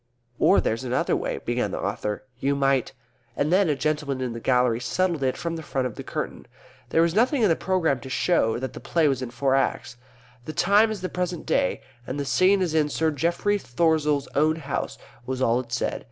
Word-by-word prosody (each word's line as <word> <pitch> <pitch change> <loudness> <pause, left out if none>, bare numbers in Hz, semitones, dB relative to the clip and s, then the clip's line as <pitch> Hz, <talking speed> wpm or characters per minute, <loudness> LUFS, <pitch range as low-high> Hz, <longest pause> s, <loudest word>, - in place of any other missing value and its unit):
"Or - - +5
there's 115 +3 -1
another 125 0 0
way," - - -2
began - - 0
the - - -4
author. 105 +2 -3 0.2
"We 140 +1 +2
might 135 -2 +1 0.2
" - - -37
And 150 +4 +1
then 190 -2 +4
a 150 - +2
gentleman 145 -1 -1
in 125 -2 -3
the 115 - -6
gallery 125 -1 +2
settled 165 +6 0
it 130 -1 0
from 165 -1 -3
the - - -6
front 135 -4 -2
of 125 - -3
the - - -8
curtain. - - -5 0.4
There 165 +5 +3
was 170 -1 +1
nothing 245 - +2
in 210 - +5
the 165 - +4
programme 170 -8 0
to 130 - -9
show 130 -5 +1
that 130 +2 -5
the - - -8
play 165 -3 +1
was 135 -3 0
in 130 - -4
four 130 +3 0
Acts. 135 -2 0 0.5
"The 155 - -5
Time 205 +6 +4
is 215 -3 -4
the 185 - -3
present 180 -2 -3
day 90 - +1 0.3
and 135 +3 -4
the 140 - -2
Scene 185 +9 +3
is 170 -4 -2
in 155 -2 +2
Sir 160 +2 0
Geoffrey 170 +7 0
Throssell's 150 -1 +1
town 155 +2 +3
house," 145 -4 -4 0.3
was 130 0 -3
all 120 -2 +2
it 120 -2 -7
said. 120 - -1
145 Hz, 225 wpm, -25 LUFS, 130-170 Hz, 0.5 s, Or